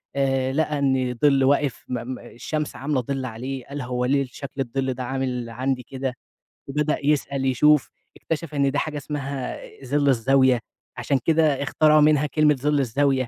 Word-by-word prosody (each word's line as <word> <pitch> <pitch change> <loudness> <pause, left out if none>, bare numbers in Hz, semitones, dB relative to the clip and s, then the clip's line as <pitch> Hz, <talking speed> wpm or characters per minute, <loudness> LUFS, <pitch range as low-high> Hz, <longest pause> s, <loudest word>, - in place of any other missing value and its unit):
آآ، 135 -1 +1
لقى 150 0 0
إن 130 -2 +1
ظِل 140 -2 +5
واقف 140 -2 +1
م 125 0 -3
م 125 - -8
الشمس 150 +6 -5
عاملة 140 -1 -1
ظِل 135 +1 -3
عليه، 130 +2 -5
قال 140 0 -6
هو 125 0 -2
ليه 140 +1 +2
شكل 135 +2 -7
الظِل 130 +1 -2
ده 130 - -5
عامل 125 -2 -3
عندي 125 +2 -2
كده؟ 130 +1 -4 0.5
وبدأ 150 +2 0
يسأل، 140 -2 +1
يشوف، 145 +2 +4 0.3
اكتشف 160 -1 -4
إن 140 -1 +2
ده 145 - 0
حاجة 150 -1 -3
اسمها 140 -3 -4 0.3
ظِل 145 +2 +1
الزاوية، 130 0 +4 0.4
عشان 135 -2 0
كده 155 -4 +3
اختراعوا 155 +1 +4
منها 150 -1 +4
كلمة 150 +1 +3
ظِل 145 +2 +1
الزاوية 135 0 +1
135 Hz, 165 wpm, -23 LUFS, 130-145 Hz, 0.5 s, ظِل